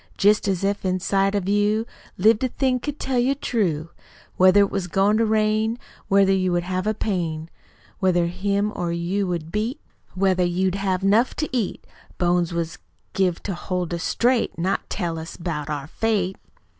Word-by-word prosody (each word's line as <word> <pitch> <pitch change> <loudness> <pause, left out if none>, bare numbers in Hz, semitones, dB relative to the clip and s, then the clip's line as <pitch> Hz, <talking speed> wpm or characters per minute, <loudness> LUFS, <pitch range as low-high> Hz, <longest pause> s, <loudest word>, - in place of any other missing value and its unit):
Jest 210 +1 +3
as 190 -1 0
if 200 +1 0
inside 195 +2 +1
of 195 -2 -1
you, 205 +2 +2 0.3
Lived 215 +5 +4
a - - +3
thing 255 0 0
could 295 +3 -5
tell 260 -2 0
you 260 +3 +2
true, 175 - -1 0.4
Whether 185 +2 +6
it 200 - +2
was 195 -3 -2
goin' 195 +5 +2
to 225 0 +2
rain, 215 +1 +1 0.3
Whether 195 0 +4
you 185 -1 +1
would 175 0 +1
have 185 +2 -2
a 215 - +1
pain, 165 -6 -2 0.5
Whether 180 -3 +2
him 200 +4 -1
or 175 -1 -2
you 180 +4 -1
would 165 -2 -3
beat, 225 - -2 0.4
Whether 185 -1 +2
you'd 180 +1 +1
have 195 -1 -1
'nuf 215 +6 +3
to 305 - -2
eat! 225 -6 -2 0.3
Bones 175 -1 +1
was 170 +1 -3 0.3
give 185 -3 0
to 195 - -3
hold 180 0 -3
us 170 - -3
straight, 245 +5 +1
Not 185 +4 -1
to - - -4
tell 170 -4 -2
us 160 +1 -8
'bout 155 -4 -4
our 145 -2 -3
Fate." 195 +2 -1
195 Hz, 180 wpm, -23 LUFS, 175-210 Hz, 0.5 s, Whether